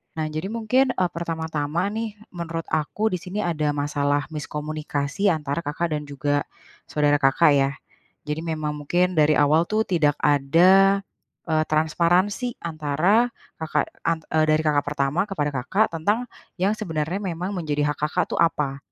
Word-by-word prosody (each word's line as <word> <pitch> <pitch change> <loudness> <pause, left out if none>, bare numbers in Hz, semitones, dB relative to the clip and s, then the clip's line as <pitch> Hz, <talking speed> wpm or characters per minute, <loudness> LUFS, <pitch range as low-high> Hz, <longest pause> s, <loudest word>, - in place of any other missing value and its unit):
Nah, 160 -1 -2
jadi 155 +4 -3
mungkin, 230 +4 +1
eee, 180 -1 +1
pertama-tama 160 +1 -2
nih, 220 -1 -4 0.2
menurut 165 -2 -4
aku 160 +8 0
di 180 - -2
sini 190 +5 -4
ada 150 -4 0
masalah 145 +1 -1
miskomunikasi 150 +3 -3
antara 150 -5 0
Kakak 165 +2 -3
dan 150 -1 -3
juga 145 +1 -1 0.4
saudara 145 -1 +2
Kakak 145 +3 +4
ya. 140 -1 +3 0.6
Jadi, 150 +2 -3
memang 155 -2 -3
mungkin 175 +5 0
dari 155 -1 +4
awal 150 +3 +4
tuh, 220 +1 +1
tidak 150 -5 +1
ada, 180 +8 +5 0.5
eee, 155 -1 +2
transparansi 175 +9 +1
antara, 170 +9 +1 0.2
Kakak, 155 -2 -1 0.2
an 165 -1 +1 0.2
eee, 155 0 +4
dari 155 0 +3
kakak 145 -1 +2
pertama 145 +2 0
kepada 190 -8 -2
Kakak 200 - +1
tentang 210 +10 0 0.3
yang 195 +4 +2
sebenarnya 175 -1 -3
memang 180 +2 -3
menjadi 150 -4 -1
hak - - -38
Kakak - - 0
tuh, - - -3
apa, 150 -5 +1
160 Hz, 150 wpm, -24 LUFS, 150-185 Hz, 0.6 s, ada